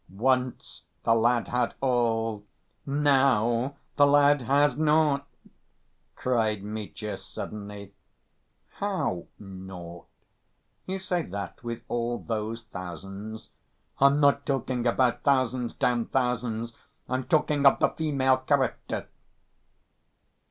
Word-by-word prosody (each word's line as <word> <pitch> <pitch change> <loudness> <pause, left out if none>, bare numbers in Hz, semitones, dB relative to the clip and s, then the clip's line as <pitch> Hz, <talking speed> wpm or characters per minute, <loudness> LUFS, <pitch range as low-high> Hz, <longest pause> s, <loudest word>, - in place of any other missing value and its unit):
"Once 125 +5 -1 0.2
the 115 - +4
lad 120 +1 +2
had 125 -1 0
all, 115 -4 0 0.4
now 135 -3 +2 0.2
the 145 -1 +6
lad 145 0 +5
has 140 +4 +3
naught," 150 -2 +2 0.9
cried 110 -5 0
Mitya 105 0 -5
suddenly. 100 -1 -8 0.8
"How 190 - -2
'naught'? 95 -3 -10 0.8
You 190 +1 -2
say 180 -2 -1
that 100 0 -6
with 120 0 -5
all 120 0 -1
those 115 0 -4
thousands!" 95 +3 -8 0.5
"I'm 140 +1 +5
not 140 -1 +4
talking 130 -3 -1
about 120 0 +2
thousands. 130 -3 +1
Damn 120 -2 +1
thousands! 120 -3 -1 0.3
I'm 130 0 -2
talking 150 -3 +2
of - - +6
the - - +3
female 135 -4 +1
character. 130 0 -1
120 Hz, 100 wpm, -27 LUFS, 110-140 Hz, 0.9 s, the